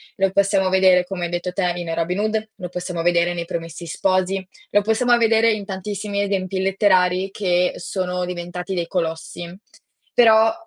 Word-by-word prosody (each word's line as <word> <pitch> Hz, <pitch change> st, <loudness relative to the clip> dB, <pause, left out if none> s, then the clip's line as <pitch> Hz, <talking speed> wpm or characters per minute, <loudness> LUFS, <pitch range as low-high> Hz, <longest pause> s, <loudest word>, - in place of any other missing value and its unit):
Lo 195 Hz, -1 st, +1 dB
possiamo 195 Hz, -1 st, +2 dB
vedere 185 Hz, -1 st, +4 dB
come 180 Hz, -2 st, -4 dB
hai -, -, -4 dB
detto 175 Hz, +1 st, -3 dB
te 180 Hz, -2 st, 0 dB
in 170 Hz, -2 st, -4 dB
Robin 170 Hz, +3 st, -1 dB
Hood, 215 Hz, 0 st, -1 dB
lo 180 Hz, -4 st, -7 dB
possiamo 180 Hz, -1 st, -4 dB
vedere 175 Hz, 0 st, +2 dB
nei 170 Hz, -1 st, -3 dB
Promessi 165 Hz, -1 st, -6 dB
Sposi, 185 Hz, +3 st, 0 dB, 0.3 s
lo 205 Hz, -, +4 dB
possiamo 240 Hz, +3 st, +3 dB
vedere 225 Hz, 0 st, +4 dB
in 215 Hz, -2 st, -2 dB
tantissimi 200 Hz, +1 st, -3 dB
esempi 190 Hz, -1 st, -2 dB
letterari 190 Hz, -1 st, +2 dB
che 180 Hz, -2 st, +1 dB
sono 180 Hz, 0 st, -3 dB
diventati 180 Hz, +1 st, -5 dB
dei 175 Hz, -2 st, -2 dB
colossi. 170 Hz, 0 st, -4 dB, 0.6 s
Però, 225 Hz, -2 st, +6 dB
185 Hz, 165 wpm, -21 LUFS, 175-200 Hz, 0.6 s, Però